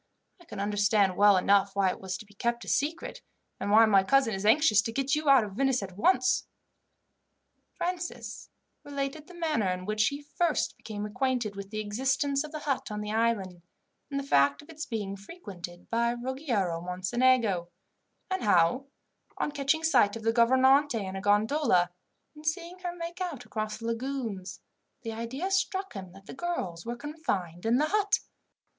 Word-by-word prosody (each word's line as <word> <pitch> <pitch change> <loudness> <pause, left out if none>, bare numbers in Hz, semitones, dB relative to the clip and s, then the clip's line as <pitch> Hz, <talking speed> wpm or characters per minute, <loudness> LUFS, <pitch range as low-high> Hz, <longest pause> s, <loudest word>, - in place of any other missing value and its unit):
I 345 - -18
can 325 - -8
understand 205 -1 +2
well 205 0 +6
enough 195 +1 +3
why 195 -2 +3
it - - -8
was 190 -1 -4
to 215 - -11
be 205 - -20
kept 235 +4 -2
a - - -15
secret, 310 +5 -1 0.4
and - - -3
why 220 +2 +7
my 200 -3 +5
cousin 265 +1 +3
is 195 +2 -2
anxious 220 -4 +5
to 225 - -4
get 275 +3 -1
you 300 -1 +1
out 270 -4 +7
of 205 -2 -6
Venice 265 0 +1
at 185 -2 -8
once." 255 +5 +2 1.3
Francis 350 0 -4 0.3
related 280 +1 -4
the 360 - -13
manner 310 - 0
in 180 0 -3
which 215 +2 +2
he 285 +1 -4
first 315 +2 0
became 210 -1 -6
acquainted 245 -1 -1
with 200 0 -7
the 215 +1 -4
existence 265 +6 0
of 305 - -8
the 310 -1 -6
hut 280 -3 -2
on 210 0 -4
the 210 0 -4
island, 215 -6 0 0.5
and 280 -1 -2
the - - -4
fact 140 - +3
of 295 - -20
its 310 -1 -7
being 205 -4 -3
frequented 195 - -10
by 235 +1 +2
Ruggiero 240 - -2
Mocenigo; 185 +1 +1 0.6
and 375 - 0
how, 205 +7 +3 0.5
on - - -1
catching 290 +2 0
sight 230 -10 +4
of 225 - -7
the 225 0 +2
gouvernante 260 +3 +4
in 195 -3 -4
a 195 - -4
gondola, 205 - +2 0.4
and 300 - -13
seeing 340 +3 -3
her 355 -1 -4
make 340 +1 -6
out 295 -9 -4
across 215 -1 -4
the 230 - -9
lagoons, 230 -6 -4 0.4
the 225 - -4
idea 260 +12 -4
struck 385 0 0
him 190 -4 -8
that 195 0 -15
the - - -9
girls 230 - -4
were 240 - -2
confined 225 - -3
in 235 +2 +4
the 305 +3 +1
hut. 410 -1 +2
230 Hz, 180 wpm, -29 LUFS, 200-285 Hz, 1.3 s, why